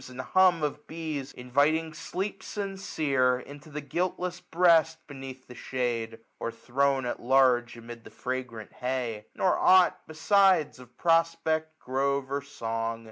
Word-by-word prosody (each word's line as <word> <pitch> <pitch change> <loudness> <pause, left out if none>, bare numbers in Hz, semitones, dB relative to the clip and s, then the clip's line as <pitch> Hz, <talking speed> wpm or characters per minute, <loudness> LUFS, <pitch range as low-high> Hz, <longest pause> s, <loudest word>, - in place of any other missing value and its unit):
And 125 0 -11
hum 180 +3 +3
of 150 0 -3
be^, 155 -4 -5
inviting 145 +6 +1
sleep 180 +5 -4
sincere 155 - 0
1266 140 +3 -7
Into - - -14
the 150 -1 -7
guiltless 180 +2 -2
breast, 165 -2 +3
beneath 135 -2 -9
the 125 - -12
shade. 120 -3 -3 0.2
Or 115 - -3
thrown 135 +2 0
at 120 - -3
large 125 -2 +3
amid 115 0 -10
the - - -12
fragrant 125 -4 -5
hay; 125 -4 -3
Nor 185 - +2
ought 185 -1 +5
besides 185 -2 +3
of 125 -1 -16
prospect, 165 -2 +1
grove, 135 0 -1
or 140 0 -1
song. 115 -4 -4
140 Hz, 140 wpm, -28 LUFS, 125-165 Hz, 0.2 s, ought